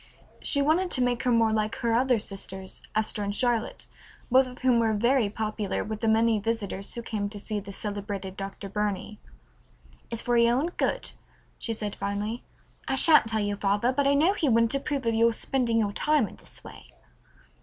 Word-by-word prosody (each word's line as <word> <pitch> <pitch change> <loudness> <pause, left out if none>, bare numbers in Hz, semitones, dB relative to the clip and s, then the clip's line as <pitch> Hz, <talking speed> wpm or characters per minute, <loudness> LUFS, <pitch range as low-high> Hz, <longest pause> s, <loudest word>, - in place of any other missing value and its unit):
She 280 -1 +4
wanted 340 +5 +2
to 255 - +2
make 245 -1 0
her 250 - +1
more 225 -2 +3
like 215 0 -1
her 235 -1 -1
other 250 +1 +3
sisters, 190 -2 -4
Esther 215 -1 0
and 200 0 -2
Charlotte, 240 -1 0 0.5
both 260 +1 +5
of 250 0 -11
whom 250 -2 +4
were 225 -1 +1
very 235 +1 +2
popular 215 -1 -3
with 215 0 -5
the 225 - -1
many 220 0 +3
visitors 205 -3 -3
who 235 - -5
came 205 -3 -3
to 205 - -4
see 210 +1 -3
the 200 0 -9
celebrated 200 -2 -5
Dr. 195 0 -6
Burney. 210 0 -3 0.9
"It's 230 - -3
for 240 0 0
your 235 +1 +4
own 310 +6 0
good," - - -1 0.5
she 230 - -2
said 210 -2 -4
finally. 210 +4 -3 0.4
"I 265 - 0
shan't 300 -3 +7
tell 220 -1 0
your 205 0 -2
father, 205 +5 +1
but 280 +1 +1
I 280 - +4
know 325 +7 +4
he 320 -8 0
wouldn't 230 0 +3
approve 275 -1 -2
of 230 - +1
your 230 +1 +3
spending 240 -2 0
your 205 -1 -1
time 295 -1 +2
in - - -13
this - - -13
way." - - -13
225 Hz, 195 wpm, -27 LUFS, 205-250 Hz, 0.9 s, shan't